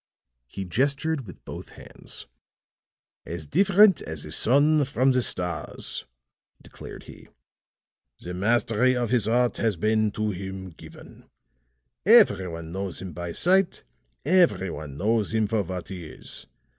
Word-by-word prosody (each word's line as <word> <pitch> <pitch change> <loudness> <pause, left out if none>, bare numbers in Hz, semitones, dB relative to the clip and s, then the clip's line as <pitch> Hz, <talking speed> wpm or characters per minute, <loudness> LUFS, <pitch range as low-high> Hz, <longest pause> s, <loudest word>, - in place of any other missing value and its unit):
He 95 +9 -6
gestured 140 - 0
with 90 - -13
both - - -9
hands. - - -7 1.0
"As 85 -2 -6
different 195 - +5
as 80 -2 -5
the 75 - -9
sun 145 - +4
from 130 0 +2
the 125 -1 +2
stars," 90 -7 -3 0.5
declared - - -11
he. - - -14 0.9
"The 90 - -7
mastery 115 +5 +2
of 120 -2 -1
his 120 -5 +2
art 120 +1 +2
has 110 -3 +1
been 110 +3 +2
to 110 0 -1
him 95 0 -7
given. - - -15 0.7
Every 190 - +6
one 85 -1 -7
knows 95 0 -4
him 95 -3 -7
by 85 +1 -5
sight; 190 - +2 0.4
every 165 - +3
one 70 -3 -8
knows 110 +3 0
him 110 -1 +2
for 110 0 +1
what 90 -1 -6
he 90 -4 -7
is. 75 - -10
110 Hz, 140 wpm, -25 LUFS, 90-130 Hz, 1.0 s, Every